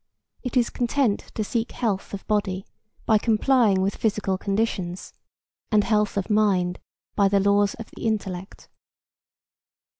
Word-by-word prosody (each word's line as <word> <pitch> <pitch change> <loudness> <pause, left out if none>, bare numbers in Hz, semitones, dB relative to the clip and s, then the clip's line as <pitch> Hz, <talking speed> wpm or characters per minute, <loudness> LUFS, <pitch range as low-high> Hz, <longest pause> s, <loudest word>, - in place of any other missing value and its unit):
It 250 0 -2
is 240 -1 +2
content 245 -3 0
to 215 - -1
seek 225 +2 -2
health 210 -5 -2
of 200 - -7
body 195 -3 -1 0.4
by 220 -2 +4
complying 220 -3 +3
with 195 +1 -1
physical 210 -3 0
conditions, 195 -3 -2 0.6
and 210 -1 +4
health 210 -2 +1
of 195 - -1
mind 195 -4 +2 0.4
by 200 - +4
the 200 0 +3
laws 200 0 +3
of 225 - -10
the - - -4
intellect. 195 -4 -4
205 Hz, 140 wpm, -24 LUFS, 195-225 Hz, 0.6 s, by